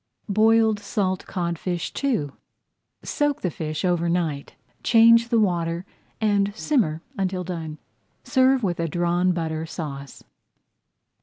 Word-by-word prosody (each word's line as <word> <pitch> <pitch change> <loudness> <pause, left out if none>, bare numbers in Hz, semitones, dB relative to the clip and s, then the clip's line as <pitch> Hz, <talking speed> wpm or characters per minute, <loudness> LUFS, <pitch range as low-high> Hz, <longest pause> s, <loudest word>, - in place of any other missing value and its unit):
BOILED 220 +1 +4
SALT 190 -3 -2
CODFISH 175 -1 -3
II 215 - 0 0.7
Soak 290 -1 -1
the 180 - -1
fish 155 +3 -4
over 175 -1 +1
night, 165 -5 -2 0.3
change 230 0 +5
the 230 -2 +3
water, 170 -3 0 0.3
and 205 -2 +2
simmer 180 - 0 0.2
until 185 -1 -1
done. 165 -4 -5 0.5
Serve 260 -2 +3
with 175 -4 -1
a 165 - 0
Drawn 175 +2 +1
Butter 160 -2 -3
Sauce. 140 -5 -7
180 Hz, 120 wpm, -24 LUFS, 165-220 Hz, 0.7 s, change